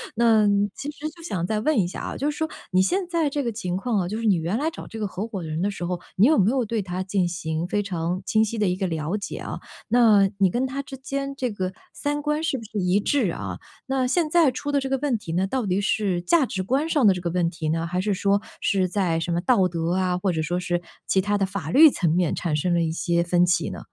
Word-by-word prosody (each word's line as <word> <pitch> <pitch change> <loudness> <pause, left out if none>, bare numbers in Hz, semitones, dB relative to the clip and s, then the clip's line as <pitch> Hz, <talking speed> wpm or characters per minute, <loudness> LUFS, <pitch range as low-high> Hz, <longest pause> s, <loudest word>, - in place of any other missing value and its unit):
那 225 -2 +4 0.3
其 290 - -5
实 305 +1 -5
就 335 +1 -15
想 180 - -2
再 215 +1 0
问 300 0 +2
一 175 - +2
下 - - -6
啊， - - -5
就 290 +2 0
是 295 - -5
说 315 - 0 0.2
你 185 0 +4
现 365 - 0
在 335 -3 +1
这 285 0 -1
个 235 - -1
情 195 -5 -3
况 215 +2 0
啊， 175 - -2
就 215 +4 -3
是 230 - -3
你 205 -3 +4
原 170 +6 -1
来 310 - 0
找 330 - -9
这 225 - -8
个 210 - -1
合 190 +2 -4
伙 210 -5 -5
人 160 0 -3
的 205 - +1
时 180 - -7
候， 175 0 -2 0.2
你 205 +6 +5
有 310 - +4
没 205 +3 +4
有 265 -2 +1
对 225 0 -2
他 185 0 -4
进 190 -1 0
行 165 -1 -3
非 205 +2 0
常 180 -1 -2
清 220 +1 +2
晰 220 +1 -4
地 205 - +2
一 - - 0
个 190 +1 -2
了 165 +2 -2
解 200 - -6
啊？ - - -6 0.3
那 215 -4 +5
你 190 -3 +3
跟 255 +2 0
他 275 +2 -4
之 270 - -9
间 275 +1 -4
这 255 -3 -2
个 185 -2 -3 0.2
三 290 0 -2
观 300 +1 -1
是 315 - 0
不 230 - -8
是 215 0 -7
一 185 0 +2
致 225 - +1
啊？ 100 - -5 0.3
那 265 -1 +1
现 305 +5 +1
在 320 -5 +4
出 290 +3 -4
的 285 - +2
这 270 - -3
个 270 - +1
问 270 -4 0
题 165 -6 -8
呢， 185 +3 +1
到 255 +1 -1
底 190 +1 0
是 195 -4 0
价 290 - +3
值 190 - -3
观 265 - 0
上 310 - +2
的 195 - +6
这 180 - -5
个 170 - -2
问 175 -1 +1
题 165 -2 -4
呢， 165 +1 -1
还 180 +1 -1
是 210 +1 0
说 200 +1 +1 0.2
是 190 -2 +1
在 180 -4 0
什 170 +1 -2
么 170 - +1
道 185 +1 +3
德 170 0 -1
啊， 185 -1 +1
或 185 +1 0
者 160 - -1
说 175 +3 -1
是 175 -1 -1 0.3
其 190 - +3
他 205 +1 0
的 195 - +1
法 185 -5 -5
律 315 +3 +8
层 175 - 0
面 175 -1 +1
产 170 -3 -2
生 175 +4 0
了 170 - +2
一 160 - 0
些 170 +1 0
分 175 +1 +3
歧 175 - +1
呢？ - - -7
200 Hz, 305 characters per minute, -24 LUFS, 175-255 Hz, 0.3 s, 律